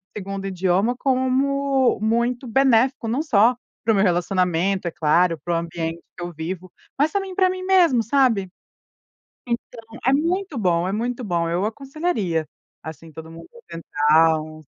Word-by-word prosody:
segundo 195 -1 -5
idioma 190 +5 +1
como 265 0 +1
muito 235 +3 0
benéfico, 255 0 +2
não 250 +7 0
só 235 -3 +4 0.3
pro 220 -1 +2
meu 195 - +3
relacionamento, 180 0 0
é - - -2
claro, 165 +2 +2
pro 175 -1 -1
ambiente 165 0 -4 0.2
que 175 - -6
eu 175 - -5
vivo, 175 +3 -6 0.3
mas 300 +2 +3
também 390 -2 -3
pra 370 -1 +3
mim 370 0 -4
mesmo, 350 -11 +4
sabe? 230 -6 +2 1.0
Então, 235 0 -4 0.2
é 265 - +4
muito 335 +1 -1
bom, 180 -3 +1
é - - -2
muito 240 +4 -3
bom! 170 -4 -1
Eu 175 +4 0
aconselharia, 225 - -2 0.4
assim, 160 0 -9
todo 160 +1 -10
mundo 165 0 -12 0.2
tentar 160 0 +2
um 155 0 -10
210 Hz, 150 wpm, -22 LUFS, 170-265 Hz, 1.0 s, só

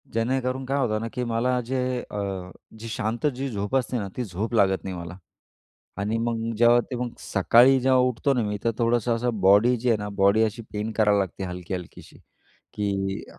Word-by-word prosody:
जेणेकरून 130 +3 -1
काय 135 +2 -1
होतं 110 -5 0
ना, 115 - -3
की 125 - -2
मला 120 +2 0
जे 130 +2 -2 0.3
अ, 95 -3 -4 0.3
जी 115 - -7
शांत 115 +2 -3
जी 135 +2 -3
झोप 105 +1 -3
असते 130 -1 0
ना, 100 - -4
ती 125 - -1
झोप 105 +3 -4
लागत 95 -4 +2
नाही 95 -1 -5
मला 85 0 -8 0.8
आणि 105 +3 -1
मग 115 0 -2
जेव्हा 120 +1 +6
ते 125 - -3
मग 120 0 -3
सकाळी 120 +7 +4
जेव्हा 130 0 +3
उठतो 125 +2 +1
ना 125 - +1
मी, 105 -1 -2
तर 115 - +3
थोडंसं 115 0 +1
असं 115 -2 -2
बॉडी 100 +6 +5
जी 125 +2 -2
आहे 115 - +4
ना, 105 0 -4
बॉडी 100 +2 +3
अशी 110 +1 -1
पेन 105 +1 -3
करावी 105 -1 +3
लागते, 95 0 -3
हलकी-हलकीशी, 90 -1 -7 0.6
की 100 -1 -2
115 Hz, 195 wpm, -25 LUFS, 100-125 Hz, 0.8 s, जेव्हा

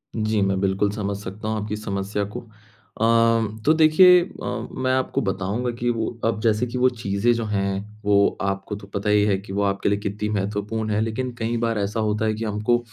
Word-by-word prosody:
जी, 110 -1 0
मैं 95 -1 +1
बिल्कुल 100 +1 +1
समझ 100 -1 -3
सकता 100 +2 -7
हूँ 110 -1 -1
आपकी 105 0 -3
समस्या 100 -1 -3
को। - - -2
अ, 110 0 0
तो 155 - +6
देखिए 165 +3 +7
अ, - - -10 0.3
मैं 130 0 -1
आपको 130 0 0
बताऊँगा 100 +5 -2
कि 120 0 0
वो 115 -2 -1 0.2
अब 115 -2 0
जैसे 110 +1 +2
कि 120 +2 -5
वो 130 +1 +4
चीज़ें 110 -1 0
जो 115 -1 -2
हैं, 100 +1 -3
वो 100 -1 +3
आपको 100 +1 -2
तो 100 -1 -11
पता 100 +1 -3
ही 105 0 +4
है 100 -2 +2
कि 95 0 -9
वो 100 - 0
आपके 100 0 0
लिए 100 0 +1
कितनी 105 +1 -3
महत्वपूर्ण 105 +2 -2
है। 105 +1 +1
लेकिन 120 +3 -2
कई 115 +1 -1
बार 115 -2 0
ऐसा 105 +3 -2
होता 105 0 0
है 110 - +1
कि 110 +1 -5
हमको 105 +3 +1
105 Hz, 215 wpm, -23 LUFS, 100-115 Hz, 0.3 s, देखिए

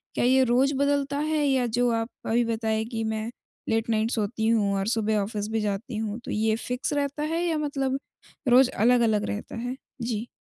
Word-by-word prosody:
क्या - - +1
ये 260 +1 +5
रोज़ 260 +3 +3
बदलता 280 0 +1
है, 305 0 0
या 265 -3 +2
जो 245 +2 +1
आप 225 +1 -1 0.2
अभी 235 +2 +2
बताए 220 -1 0
कि 225 -1 -3
मैं 220 +1 -2 0.4
लेट 225 +1 0
नाइट 220 +1 +1
सोती 220 0 -1
हूँ 210 -3 +2
और 195 +1 -1
सुबह 220 -2 +1
ऑफिस 205 +1 -2
भी 225 - 0
जाती 210 +3 -3
हूँ, 220 0 -3
तो 240 - -7
ये 220 +1 +1
फिक्स 250 +5 -3
रहता 285 +1 -1
है 330 +3 -1
या 325 -2 +1
मतलब 275 -3 -1 0.5
रोज़ 250 +1 +6
अलग-अलग 225 -2 +4
रहता 205 - -5
है? 245 +3 -3 0.3
जी। 230 -1 -2
230 Hz, 195 wpm, -26 LUFS, 220-265 Hz, 0.5 s, रोज़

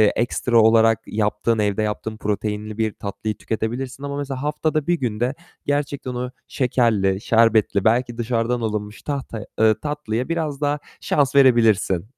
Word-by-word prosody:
ekstra 120 0 +2
olarak 115 0 +5
yaptığın, 105 +1 0
evde 105 0 +1
yaptığın 110 +1 -3
proteinli 105 0 -3
bir 110 -2 0
tatlıyı 105 +2 -4
tüketebilirsin 125 +5 -4
ama 140 0 -4
mesela 135 -2 -4
haftada 150 0 -1
1 175 - +3
günde 120 +2 -1 0.3
gerçekten 140 -2 -2
o 125 +1 -3 0.2
şekerli, 110 -7 +1
şerbetli, 110 -4 +3
belki 120 +1 +2
dışarıdan 120 +1 0
alınmış 105 -1 -3
tahtaya 135 -7 -4
eee, 110 -1 +5
tatlıya 145 -4 -3
biraz 155 -4 -2
daha 145 0 0 0.2
şans 140 -1 +1
verebilirsin. 115 -9 +4
115 Hz, 140 wpm, -22 LUFS, 110-135 Hz, 0.3 s, olarak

